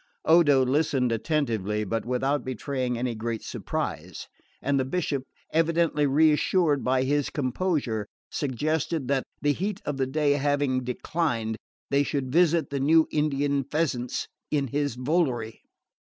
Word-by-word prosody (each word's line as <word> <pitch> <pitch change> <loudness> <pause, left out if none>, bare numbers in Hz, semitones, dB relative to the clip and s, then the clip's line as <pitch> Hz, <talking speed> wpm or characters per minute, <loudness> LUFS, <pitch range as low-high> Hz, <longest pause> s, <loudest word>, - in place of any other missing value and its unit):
Odo 145 -6 +5
listened 135 -2 +1
attentively, 115 - 0
but 115 +2 -2
without 135 +3 0
betraying 130 0 -2
any 120 0 -1
great 115 0 -4
surprise; - - -4 0.3
and 140 -1 +1
the - - +2
Bishop, 140 -2 -2 0.3
evidently 165 -2 +2
reassured 150 +1 +3
by 130 0 +2
his 145 +1 +1
composure, 130 - -1 0.2
suggested 150 +2 -1
that, 135 -2 0 0.2
the 145 0 +3
heat 195 +5 -3
of 145 -2 -2
the 135 -1 0
day 145 +1 +1
having 145 -2 +1
declined, 125 -3 -1 0.4
they 140 0 +4
should 140 -2 -2
visit 165 -3 +3
the 140 - -1
new 160 +4 +4
Indian 145 -2 +1
pheasants 135 -4 -2 0.2
in 140 -3 0
his 145 -1 -1
volary. 125 -5 -1
140 Hz, 135 wpm, -26 LUFS, 125-155 Hz, 0.4 s, Odo